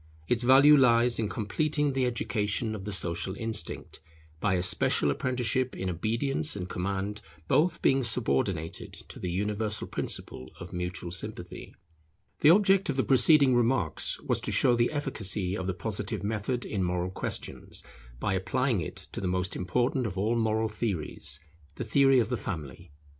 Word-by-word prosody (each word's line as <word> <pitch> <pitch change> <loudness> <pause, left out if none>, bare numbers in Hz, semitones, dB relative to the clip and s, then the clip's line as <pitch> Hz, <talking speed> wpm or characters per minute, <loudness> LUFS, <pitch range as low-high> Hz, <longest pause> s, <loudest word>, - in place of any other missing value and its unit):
Its 120 -1 +1
value 135 +4 +7
lies 120 -3 +4
in 110 -2 -1
completing 145 +7 -1
the 130 -1 +1
education 110 -2 -1
of 100 -3 -7
the 105 - -4
social 95 0 -2
instinct, 110 0 -3 0.4
by 100 0 +1
a 90 - 0
special 75 -5 +2
apprenticeship 130 - -1
in 95 0 -3
obedience 115 - 0
and 90 -3 -5
command, 100 +3 -3 0.3
both 160 - +2
being 135 0 +3
subordinated 110 -8 -2
to - - -11
the 90 - -3
universal 105 +3 -2
principle 65 - -3
of 90 +1 -9
mutual 90 0 -4
sympathy. 90 -1 -6 0.6
The 150 - +5
object 195 +1 +4
of 140 - 0
the 130 - +2
preceding 140 0 +6
remarks 120 -9 +1
was - - 0
to - - -2
show 120 - +5
the 120 0 +1
efficacy 105 -10 -2
of 95 -2 -4
the 95 - -2
Positive 105 0 -3
method 110 +4 -2
in 100 - -3
moral 90 0 -1
questions - - -4 0.4
by 100 - -1
applying 120 +3 0
it 75 - -8
to - - -5
the 95 - -2
most 90 +1 -1
important 120 +7 0
of 95 -2 -6
all 110 +5 +1
moral 110 -1 +1
theories, 95 -10 -3 0.4
the - - -4
theory 135 +4 +4
of 120 - +2
the 125 - -1
Family. 75 - -7
110 Hz, 165 wpm, -28 LUFS, 95-130 Hz, 0.6 s, value